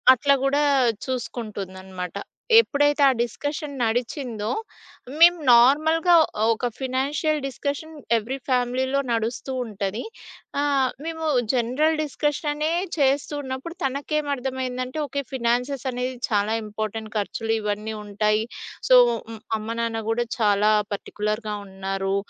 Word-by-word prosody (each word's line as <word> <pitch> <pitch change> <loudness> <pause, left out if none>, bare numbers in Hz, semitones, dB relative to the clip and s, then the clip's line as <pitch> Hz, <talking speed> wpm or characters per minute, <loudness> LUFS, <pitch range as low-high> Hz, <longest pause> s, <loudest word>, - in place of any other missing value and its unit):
అట్లా 280 +3 +3
గూడా 285 +2 +2 0.4
చూసుకుంటుందన్నమాట. 195 -7 -5 0.4
ఎప్పుడైతే 290 -8 +2
ఆ - - +7
డిస్కషన్ 290 +5 -3
నడిచిందో, 235 -1 -1 0.7
మేము 345 +1 +7
నార్మల్‌గా 310 +8 +5 0.4
ఒక 230 +2 0
ఫినాన్షియల్ 280 +4 0
డిస్కషన్ 285 +4 -4 0.2
ఎవ్రీ 235 +5 -3
ఫ్యామిలీలో 255 +2 +1
నడుస్తూ 230 +3 -2
ఉంటది. 205 0 -3 0.6
ఆహ్, 275 -3 +2 0.2
మేము 320 -1 -4 0.3
జనరల్ 260 +6 +1
డిస్కషన్ 295 +1 -1
అనే 305 +2 -1 0.3
చేస్తూ 280 +1 +2
ఉన్నప్పుడు 265 +5 -6
తనకేర్థమైందంటే, 265 -2 -2
అంటే 255 +5 -6
ఓకే 280 +1 -3
ఫినాన్సెస్ 250 +2 0
అనేది 250 +1 -3
చాలా 210 0 +1
ఇంపార్టెంట్. 215 +1 -5
ఖర్చులు 225 +2 -2
ఇవన్నీ 210 +1 -3
ఉంటాయి. 210 +1 +1 0.4
సో, 255 - +8 0.6
అమ్మ 215 - -7
నాన్న 225 -1 -1
గూడా 240 +1 +1
చాలా 210 -1 +4 0.2
పర్టిక్యులర్‌గా 210 +1 -3
ఉన్నారు. 195 0 -2
250 Hz, 110 wpm, -24 LUFS, 215-285 Hz, 0.7 s, సో